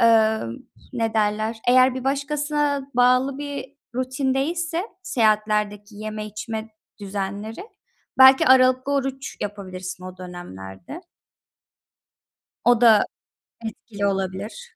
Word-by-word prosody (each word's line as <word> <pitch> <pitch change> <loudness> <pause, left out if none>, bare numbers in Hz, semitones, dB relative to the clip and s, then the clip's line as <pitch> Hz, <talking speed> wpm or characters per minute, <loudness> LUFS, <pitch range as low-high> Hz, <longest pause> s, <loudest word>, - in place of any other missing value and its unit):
Emm, 220 - +4 0.4
ne 225 -3 -1
derler, 215 +1 0
eğer 255 +1 +6
bir 260 -1 -5
başkasına 290 0 0
bağlı 255 +2 +3
bir 285 -1 -6 0.2
rutin 260 +1 -1
değilse 335 +5 -1 0.2
seyahatlerdeki 215 - 0
yeme 215 0 -5
içme 220 +1 -5 0.3
düzenleri, 205 - -5 0.5
belki 265 0 +8
aralıklı 255 +1 +5
oruç 270 -1 -2
yapabilirsin 185 -3 -6
o 185 0 -8
dönemlerde. 175 - -9 1.7
O 240 -1 +5
da 225 -3 +6 0.6
etkili 210 -2 -5
olabilir. 200 - -4
225 Hz, 100 wpm, -23 LUFS, 205-265 Hz, 1.7 s, belki